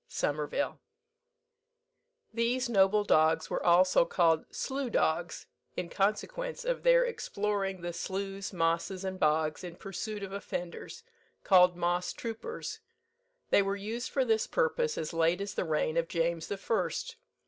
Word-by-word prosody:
SOMERVILLE. 150 Hz, -, -2 dB, 1.5 s
These 240 Hz, +2 st, 0 dB
noble 205 Hz, -1 st, +4 dB
dogs 160 Hz, -4 st, +3 dB
were -, -, -1 dB
also 180 Hz, +1 st, +5 dB
called 165 Hz, -2 st, +2 dB
"Slough 265 Hz, -2 st, -3 dB
dogs," 170 Hz, 0 st, 0 dB, 0.3 s
in 175 Hz, -1 st, -3 dB
consequence 475 Hz, -, -1 dB
of -, -, -1 dB
their -, -, +5 dB
exploring 200 Hz, -, -2 dB
the 175 Hz, 0 st, -4 dB
sloughs, 195 Hz, +2 st, -4 dB
mosses, 170 Hz, +2 st, -1 dB
and 190 Hz, 0 st, -4 dB
bogs, 155 Hz, +1 st, +1 dB
in 175 Hz, -2 st, -7 dB
pursuit 200 Hz, +3 st, -5 dB
of 195 Hz, -, -6 dB
offenders, 195 Hz, -, -6 dB, 0.4 s
called 180 Hz, -2 st, +5 dB
Moss 175 Hz, +1 st, 0 dB
troopers. 230 Hz, -, -6 dB, 0.7 s
They -, -, +6 dB
were 195 Hz, 0 st, -1 dB
used 220 Hz, +5 st, -4 dB
for 265 Hz, -2 st, +1 dB
this 220 Hz, -2 st, +2 dB
purpose 480 Hz, -1 st, 0 dB
as 155 Hz, -, -3 dB
late 165 Hz, +2 st, +2 dB
as 200 Hz, 0 st, -4 dB
the -, -, -2 dB
reign 155 Hz, 0 st, 0 dB
of 165 Hz, 0 st, +1 dB
James 165 Hz, -1 st, -1 dB
the 200 Hz, -, -3 dB
First. 230 Hz, -, -2 dB
195 Hz, 140 wpm, -30 LUFS, 170-230 Hz, 1.5 s, They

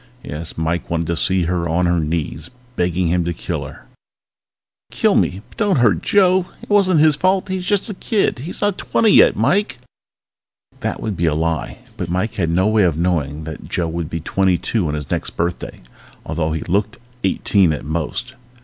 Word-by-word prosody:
Yes, 80 Hz, +2 st, -5 dB
Mike 80 Hz, +2 st, -2 dB
wanted 85 Hz, 0 st, -1 dB
to 85 Hz, +1 st, -1 dB
see 95 Hz, +2 st, +1 dB
her 85 Hz, 0 st, -1 dB
on 85 Hz, +2 st, +1 dB
her 85 Hz, 0 st, +2 dB
knees, 80 Hz, 0 st, -3 dB, 0.3 s
begging 90 Hz, 0 st, 0 dB
him 90 Hz, +1 st, +1 dB
to 85 Hz, 0 st, -3 dB
kill -, -, -4 dB
her! -, -, -13 dB, 1.1 s
Kill -, -, +2 dB
me, 95 Hz, +3 st, +1 dB
but -, -, -17 dB
don't 205 Hz, -3 st, +2 dB
hurt 110 Hz, -9 st, +3 dB
Joe! 185 Hz, -2 st, +3 dB, 0.2 s
It -, -, -10 dB
wasn't 185 Hz, -6 st, +4 dB
his 155 Hz, -2 st, +5 dB
fault! 185 Hz, +4 st, +1 dB
He's 185 Hz, -1 st, -3 dB
just 205 Hz, +1 st, +1 dB
a 210 Hz, -, -4 dB
kid 200 Hz, -, 0 dB
he's 155 Hz, +8 st, -7 dB
not 205 Hz, -2 st, 0 dB
twenty 220 Hz, -2 st, +2 dB
yet, -, -, +6 dB
Mike! 205 Hz, +3 st, +1 dB, 1.0 s
That -, -, -3 dB
would 105 Hz, -3 st, -2 dB
be 85 Hz, 0 st, 0 dB
a 75 Hz, -, +1 dB
lie 80 Hz, +7 st, -2 dB, 0.2 s
but 90 Hz, -5 st, -4 dB
Mike 95 Hz, +5 st, -1 dB
had 85 Hz, -5 st, -1 dB
no 90 Hz, +3 st, +2 dB
way 110 Hz, 0 st, +3 dB
of 85 Hz, -5 st, +2 dB
knowing 80 Hz, -4 st, -1 dB
that 80 Hz, -1 st, -8 dB
Joe 85 Hz, -2 st, -1 dB
would 85 Hz, -1 st, -4 dB
be 80 Hz, -1 st, -4 dB
twenty 95 Hz, +2 st, +1 dB
two 105 Hz, -3 st, -1 dB
on 75 Hz, -, -2 dB
his 75 Hz, -2 st, -6 dB
next -, -, -3 dB
birthday, 85 Hz, +1 st, -3 dB, 0.4 s
although 80 Hz, 0 st, -1 dB
he 80 Hz, -, -2 dB
looked 100 Hz, +5 st, -1 dB, 0.3 s
eighteen 95 Hz, -1 st, +2 dB
at 75 Hz, -, -4 dB
most. 85 Hz, -, -3 dB
90 Hz, 195 wpm, -19 LUFS, 80-125 Hz, 1.1 s, yet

